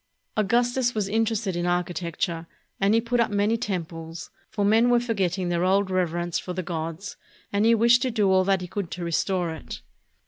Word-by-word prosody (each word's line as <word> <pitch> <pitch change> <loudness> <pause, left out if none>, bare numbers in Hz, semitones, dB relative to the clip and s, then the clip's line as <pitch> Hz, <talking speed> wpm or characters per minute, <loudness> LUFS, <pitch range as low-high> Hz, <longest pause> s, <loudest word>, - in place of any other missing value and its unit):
Augustus 240 +4 +1
was 210 -2 0
interested 220 -2 0
in 175 0 -1
architecture, 175 -1 -2 0.3
and 200 +2 +3
he - - +5
put 240 +1 -1
up 235 - +3
many 205 +2 +1
temples, 165 -6 -5 0.2
for 210 -2 -1
men 225 +4 +4
were 245 0 +5
forgetting 190 -6 -1
their 175 0 0
old 190 +1 +2
rev 185 -2 +1
erence 175 +1 -2
for 180 - -5
the 185 +1 -3
gods, 165 +2 -5 0.4
and 205 +2 +2
he 230 - +6
wished 235 +2 +5
to 260 - +1
do 210 -5 +2
all 185 0 +4
that 195 0 +1
he 180 - -5
could 195 -1 -4
to 180 - -5
restore 175 +1 0
it. 160 - -8
195 Hz, 200 wpm, -25 LUFS, 175-225 Hz, 0.4 s, he